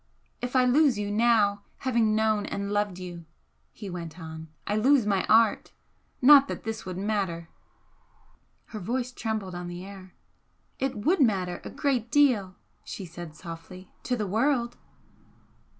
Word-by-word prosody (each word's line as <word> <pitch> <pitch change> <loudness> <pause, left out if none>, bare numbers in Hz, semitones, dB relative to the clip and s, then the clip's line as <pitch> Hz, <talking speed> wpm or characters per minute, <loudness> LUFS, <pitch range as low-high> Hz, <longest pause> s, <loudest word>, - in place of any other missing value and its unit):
"If 245 +1 -4
I 255 -1 +5
lose 270 -1 +4
you 205 0 -2
now, 210 -2 +3 0.2
having 230 -5 +1
known 215 -1 +1
and 200 0 -4
loved 205 -3 0
you," 175 -2 -8 0.5
he 210 - -9
went 175 -2 -7
on 160 -1 -8 0.2
"I 205 - -1
lose 255 +2 +4
my 195 -3 0
art. 225 -1 +3 0.5
Not 280 +1 +8
that - - -6
this 220 -3 -5
would 185 -1 -5
matter 190 -5 -2 0.6
" - - -36
Her 215 - -5
voice 245 +6 -2
trembled 220 -6 -4
on 175 0 -6
the 175 +1 -7
air. 190 -2 -12 0.6
"It 270 0 -1
would 315 - +1
matter 185 -7 +1
a - - -7
great 255 -6 -1
deal" 235 -9 +3 0.3
she 195 - -7
said, 170 -2 -9
softly 175 +2 -10
"to 250 - -1
the 215 - -2
world!" 235 +4 0
210 Hz, 155 wpm, -27 LUFS, 185-240 Hz, 0.6 s, Not